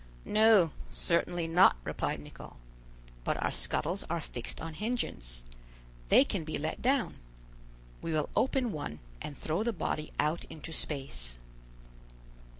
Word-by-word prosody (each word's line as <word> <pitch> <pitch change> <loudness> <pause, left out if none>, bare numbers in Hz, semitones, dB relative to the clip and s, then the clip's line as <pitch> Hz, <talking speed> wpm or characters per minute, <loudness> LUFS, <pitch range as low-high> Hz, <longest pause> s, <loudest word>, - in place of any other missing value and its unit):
"No! 215 -6 +6 0.2
certainly 170 0 +1
not," 170 +3 +7
replied - - -2
Nicholl; - - -11 0.7
"but - - 0
our - - +1
scuttles 160 - +1
are 170 +1 0
fixed 120 -6 -5
on 165 -1 -5
hinges; 155 - -2 0.7
they - - +8
can 200 - -2
be 155 0 -3
let 155 +2 -3
down. 265 0 +1 0.8
We 165 - -3
will 155 -2 +1
open 260 -3 +2
one, 145 - -4 0.2
and 145 - -6
throw 160 +5 -1
the 235 +2 +1
body 155 -3 -2
out 155 +3 +1
into 160 +1 -8
space." 135 - -2
165 Hz, 135 wpm, -31 LUFS, 150-210 Hz, 0.8 s, they